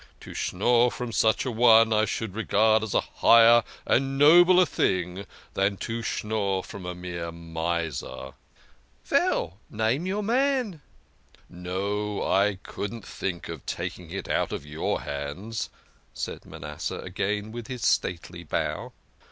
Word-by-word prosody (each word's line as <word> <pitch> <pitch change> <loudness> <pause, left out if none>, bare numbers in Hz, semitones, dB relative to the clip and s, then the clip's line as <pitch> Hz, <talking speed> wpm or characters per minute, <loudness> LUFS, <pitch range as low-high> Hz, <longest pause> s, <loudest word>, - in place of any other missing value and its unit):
To - - -10
schnorr 120 +6 +2
from 120 -1 -5
such 110 +3 +2
a 130 - -1
one 115 -1 +6
I 110 0 +3
should 110 -1 -3
regard 110 +1 +3
as 110 -3 -4
a - - +4
higher 115 0 +6 0.2
and 135 +1 +1
nobler 175 +5 +7
thing 95 - -1 0.3
than 100 0 +1
to 115 +3 -4
schnorr 105 -4 -1
from 95 -3 -9
a 90 - -4
mere 85 -2 -5
miser." 85 -2 -4 0.4
" - - -35
Veil, 85 +4 +1
name 115 +10 0
your 205 +3 -1
man." 245 - +1 0.7
"No 100 +4 -3
I 100 0 +2
couldn't 105 +1 -6
think 90 -3 -4
of 80 -4 -7
taking - - -5
it - - -5
out - - 0
of - - -5
your 75 +1 -2
hands," 75 +11 -5 0.5
said - - -5
Manasseh 75 -2 -6
again 105 +2 -3
with 115 -1 -7
his 125 -2 -4
stately 85 0 -1
bow. 80 - -3
105 Hz, 140 wpm, -26 LUFS, 90-115 Hz, 0.7 s, nobler